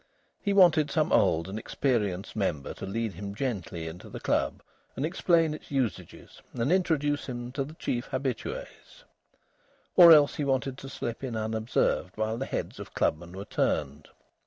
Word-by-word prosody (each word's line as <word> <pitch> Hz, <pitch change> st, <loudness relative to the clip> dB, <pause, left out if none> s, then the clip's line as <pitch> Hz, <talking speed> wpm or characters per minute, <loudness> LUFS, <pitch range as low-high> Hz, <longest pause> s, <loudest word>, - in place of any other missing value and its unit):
He 200 Hz, -, 0 dB
wanted 170 Hz, -6 st, +5 dB
some -, -, +1 dB
old 80 Hz, +2 st, +3 dB
and 100 Hz, +3 st, -4 dB
experienced 105 Hz, -7 st, -1 dB
member 90 Hz, -9 st, -2 dB
to -, -, -7 dB
lead 110 Hz, +1 st, -2 dB
him 100 Hz, 0 st, -7 dB
gently 95 Hz, -10 st, -3 dB
into 85 Hz, +2 st, -9 dB
the -, -, -7 dB
club -, -, 0 dB, 0.3 s
and 135 Hz, -, -1 dB
explain 165 Hz, -2 st, +2 dB
its 155 Hz, -, -10 dB
usages 130 Hz, -9 st, -3 dB
and 120 Hz, +5 st, 0 dB
introduce 150 Hz, -6 st, +1 dB
him 120 Hz, -1 st, -5 dB
to 135 Hz, +1 st, -2 dB
the 150 Hz, +4 st, -10 dB
chief 120 Hz, -6 st, -3 dB
habitués. 130 Hz, -3 st, -5 dB, 0.9 s
Or 170 Hz, -2 st, +10 dB
else 150 Hz, -3 st, +7 dB
he 150 Hz, -, -1 dB
wanted 135 Hz, -1 st, -1 dB
to 135 Hz, -, -8 dB
slip 120 Hz, -1 st, -5 dB
in 125 Hz, -3 st, -3 dB
unobserved 110 Hz, -3 st, 0 dB
while 110 Hz, +1 st, -1 dB
the 135 Hz, -, -3 dB
heads -, -, -4 dB
of -, -, -9 dB
clubmen 85 Hz, +3 st, 0 dB
were 100 Hz, -, -6 dB
turned. 75 Hz, +1 st, -1 dB
120 Hz, 165 wpm, -28 LUFS, 100-145 Hz, 0.9 s, Or